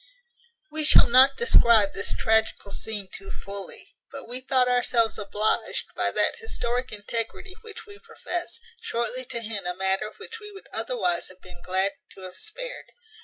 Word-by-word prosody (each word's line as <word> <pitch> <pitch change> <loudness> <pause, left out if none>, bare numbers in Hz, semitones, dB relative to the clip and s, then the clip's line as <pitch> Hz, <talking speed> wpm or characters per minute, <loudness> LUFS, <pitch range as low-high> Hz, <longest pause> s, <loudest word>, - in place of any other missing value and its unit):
We 310 0 -3
shall 300 - +8
not 260 +3 +7
describe 230 - +5
this 200 - -2
tragical 220 -2 +1
scene 205 -1 -3
too 195 0 -8
fully; 200 0 -7 0.2
but 275 -3 -9
we 250 +2 -2
thought 255 -1 +2
ourselves 245 -3 +2
obliged, 210 +1 -1
by - - +1
that - - +1
historic 250 - -3
integrity 225 - -5
which 450 0 -10
we 410 -1 -14
profess, 450 -6 -4 0.2
shortly 240 +2 -2
to 235 - -4
hint 210 -4 -4
a 180 - -2
matter 190 +3 -1
which 455 - -8
we 420 -1 -10
would 390 - -12
otherwise 470 -8 0
have 185 0 -14
been 180 -1 -13
glad 190 +2 +1 0.2
to 190 - -13
have 185 -1 -10
spared. - - -6
235 Hz, 165 wpm, -25 LUFS, -, 0.2 s, shall